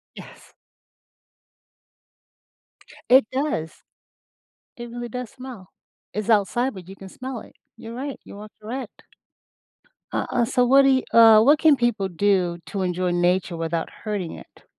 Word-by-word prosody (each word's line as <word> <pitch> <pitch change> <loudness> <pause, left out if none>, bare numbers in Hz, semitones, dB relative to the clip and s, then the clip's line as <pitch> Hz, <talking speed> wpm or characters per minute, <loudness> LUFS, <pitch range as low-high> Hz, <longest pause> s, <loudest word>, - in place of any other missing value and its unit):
Yes. - - -14 2.6
It 260 -2 +7
does. 260 - -3 1.0
It 240 0 -8
really 240 0 -6
does 250 -1 -6
smell. 250 -8 -11 0.4
It's 215 +2 -4
outside, 225 +5 +2
but 185 -2 -11
you 195 - -10
can 195 -1 -11
smell 255 0 -7
it. - - -15 0.2
You're 230 +1 -9
right. 275 +2 -5
You 200 - -12
are 210 0 -10
correct. 240 +1 -7 1.1
Uh - - -1
uh, 240 -2 +2
so 250 +2 +2
what 275 +2 +6
do 270 - +4
you 260 -1 +3
uh, 225 -2 +8
what 290 +5 +5
can 315 -3 +5
people 235 -6 0
do 180 -1 0
to 195 - -4
enjoy 180 0 -1
nature 175 0 0
without 165 0 -2
hurting 205 -6 -3
it? - - -15
220 Hz, 145 wpm, -23 LUFS, 185-255 Hz, 2.6 s, uh